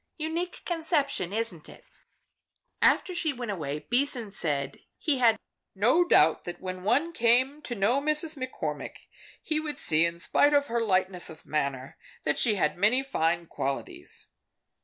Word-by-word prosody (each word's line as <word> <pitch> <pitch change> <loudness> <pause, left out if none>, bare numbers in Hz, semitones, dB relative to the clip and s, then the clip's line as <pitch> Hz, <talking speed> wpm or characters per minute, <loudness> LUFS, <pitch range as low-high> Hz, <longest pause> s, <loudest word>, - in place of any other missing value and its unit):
Unique 335 +3 -4
conception, 310 - -1
isn't 210 -7 -3
it?" - - -15 1.0
After 365 - +3
she 330 -3 0
went 240 -4 -5
away, 150 -5 -5
Beason 245 -4 +1
said 145 -7 -2 0.2
he 285 -4 0
had 230 -3 +4 0.4
no 245 - +4
doubt 160 - +4
that 175 - -6
when 185 -1 -6
one 270 - +1
came 255 +4 +3
to 245 - -5
know 230 +7 +2
Miss 305 +1 +3
McCormick, 260 -3 -5 0.5
he 310 -1 0
would 305 -1 -5
see, 155 +1 +3
in 170 0 -6
spite 290 +11 +3
of 285 0 +3
her 235 0 0
lightness 185 -4 0
of 160 0 -13
manner, 140 -3 -3 0.2
that 150 - +1
she 220 -4 +4
had 170 -2 0
many 230 +7 +4
fine 170 -10 0
qualities. 135 -3 -4
230 Hz, 155 wpm, -27 LUFS, 175-285 Hz, 1.0 s, had